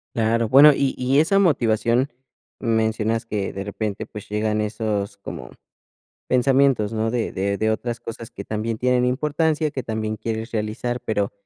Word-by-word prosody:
Claro. 115 Hz, 0 st, +1 dB
Bueno, 145 Hz, +5 st, +8 dB
y 135 Hz, -1 st, 0 dB
y 130 Hz, +2 st, +1 dB
esa 180 Hz, +6 st, +3 dB
motivación, 120 Hz, -, +2 dB, 0.5 s
mencionas 110 Hz, 0 st, 0 dB
que 105 Hz, -3 st, -2 dB
de 95 Hz, -, -5 dB
repente, 105 Hz, +1 st, -4 dB
pues, 105 Hz, -2 st, -10 dB
llegan 105 Hz, +1 st, 0 dB
esos 105 Hz, -2 st, -2 dB
como 65 Hz, -9 st, -8 dB, 0.8 s
pensamientos, 130 Hz, -4 st, +3 dB
¿no?, 110 Hz, 0 st, 0 dB
de 120 Hz, -1 st, -1 dB
de 100 Hz, +1 st, -1 dB
de 110 Hz, 0 st, +1 dB
otras 120 Hz, +2 st, -3 dB
cosas 115 Hz, -1 st, -8 dB
que 100 Hz, -, -8 dB
también 110 Hz, +1 st, -3 dB
tienen 125 Hz, 0 st, +2 dB
importancia, 150 Hz, +4 st, 0 dB
que 135 Hz, -3 st, -4 dB
también 110 Hz, -1 st, -3 dB
quieres 110 Hz, +1 st, -4 dB
realizar. 110 Hz, +3 st, -2 dB
Pero 105 Hz, -2 st, -1 dB
115 Hz, 155 wpm, -22 LUFS, 110-125 Hz, 0.8 s, Bueno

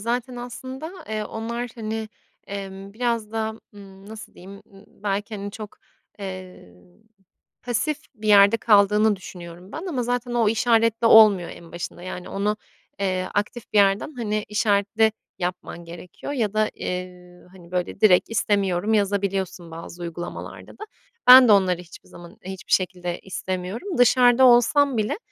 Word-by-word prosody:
zaten 245 Hz, +3 st, -3 dB
aslında, 260 Hz, +6 st, -7 dB, 0.2 s
eee, 215 Hz, -1 st, -3 dB
onlar, 235 Hz, +3 st, -5 dB
hani, 220 Hz, -1 st, -4 dB, 0.4 s
emm, 195 Hz, 0 st, -7 dB
biraz 230 Hz, -1 st, -2 dB
daha, 220 Hz, -1 st, -1 dB, 0.2 s
ımm, 195 Hz, -1 st, -14 dB
nasıl 220 Hz, +1 st, -10 dB
diyeyim, 195 Hz, +2 st, -12 dB
ımm, 195 Hz, +1 st, -16 dB, 0.2 s
belki, 205 Hz, +2 st, -2 dB
hani, 200 Hz, 0 st, -6 dB
çok, 210 Hz, 0 st, -10 dB, 0.4 s
eee, 185 Hz, -, -9 dB, 0.9 s
pasif 280 Hz, +5 st, -1 dB, 0.2 s
bir 215 Hz, 0 st, -6 dB
yerde 205 Hz, +2 st, +6 dB
kaldığını 210 Hz, 0 st, +4 dB
düşünüyorum 180 Hz, 0 st, -11 dB
ben. 330 Hz, -, -6 dB
Ama 270 Hz, -10 st, -2 dB
zaten 245 Hz, 0 st, -2 dB
o 230 Hz, -3 st, +3 dB
işaretle 230 Hz, 0 st, +2 dB
olmuyor 210 Hz, -6 st, +7 dB
en 170 Hz, -1 st, -12 dB
başında. 175 Hz, 0 st, -7 dB
Yani, 180 Hz, -1 st, -7 dB
onu, 210 Hz, +2 st, -1 dB, 0.4 s
eee, 185 Hz, -1 st, -1 dB
aktif 210 Hz, +3 st, -3 dB
bir 210 Hz, -, +3 dB
yerden, 200 Hz, +8 st, +3 dB
hani, 215 Hz, -3 st, -2 dB
işaretle 210 Hz, +1 st, +2 dB, 0.3 s
yapman 180 Hz, -1 st, -5 dB
gerekiyor 175 Hz, +9 st, -9 dB
ya 220 Hz, -7 st, -1 dB
da, 215 Hz, 0 st, +1 dB
eee, 180 Hz, -1 st, -7 dB
hani, 180 Hz, -2 st, -16 dB
böyle, 180 Hz, -1 st, -3 dB
direkt 185 Hz, -4 st, +5 dB
“İstemiyorum” 205 Hz, -2 st, 0 dB
yazabiliyorsun 195 Hz, -4 st, -1 dB
bazı 165 Hz, +1 st, -9 dB
uygulamalarda 175 Hz, 0 st, -7 dB
da. -, -, -10 dB, 0.4 s
Ben 255 Hz, 0 st, +10 dB
de -, -, +6 dB
onları 185 Hz, -3 st, +3 dB
hiçbir 175 Hz, 0 st, -15 dB
zaman, 175 Hz, +4 st, -13 dB
hiçbir 190 Hz, 0 st, -9 dB
şekilde 180 Hz, -2 st, 0 dB
istemiyorum. 190 Hz, -, -5 dB
Dışarıda 245 Hz, +1 st, +5 dB
olsam 255 Hz, +2 st, +4 dB
bile, 215 Hz, -1 st, -1 dB
205 Hz, 145 wpm, -23 LUFS, 185-230 Hz, 0.9 s, Ben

